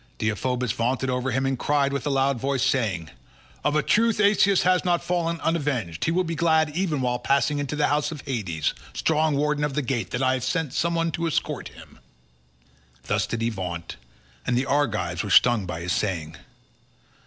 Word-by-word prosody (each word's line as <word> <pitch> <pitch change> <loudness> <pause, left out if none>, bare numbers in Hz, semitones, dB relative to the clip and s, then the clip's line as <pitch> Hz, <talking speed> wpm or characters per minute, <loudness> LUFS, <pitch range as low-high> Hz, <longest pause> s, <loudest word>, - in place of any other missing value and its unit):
Deiphobus 125 +3 -1
vaunted 130 +3 -1
over 125 +1 -1
him 130 +2 0
and 135 -1 -1
cried 140 -1 +1
with 140 0 -2
a - - +1
loud 135 -2 +1
voice 135 0 0
saying, 90 - 0 0.5
"Of 145 - +1
a 150 - +2
truth 230 0 +2
Asius 200 -2 +4
has 180 0 +3
not 175 -2 +1
fallen 170 -1 -1
unavenged; 135 - -1
he - - +1
will 185 +2 +2
be 165 -1 -3
glad 160 -2 +2
even 170 -6 0
while 125 -1 0
passing 140 +3 +1
into 145 0 -3
the 150 - +2
house 150 +1 +1
of 150 -3 -7
Hades, 95 - -2 0.2
strong 155 -1 +1
warden 150 +1 0
of 145 -2 -1
the 150 - 0
gate, 120 -6 -2
that 125 - -2
I 130 0 +3
have 130 -2 -2
sent 145 +1 -1
some 170 +2 0
one 165 0 0
to 170 +1 -2
escort 160 - -2
him." - - -15 1.0
Thus - - 0
did 115 - -3
he 115 - +1
vaunt, 90 -5 -5 0.5
and 120 - +2
the 130 - +1
Argives 110 -12 0
were 105 - -5
stung 115 -3 +5
by 85 -1 -5
his 85 0 -1
saying. 80 -6 -2
135 Hz, 200 wpm, -25 LUFS, 115-155 Hz, 1.0 s, stung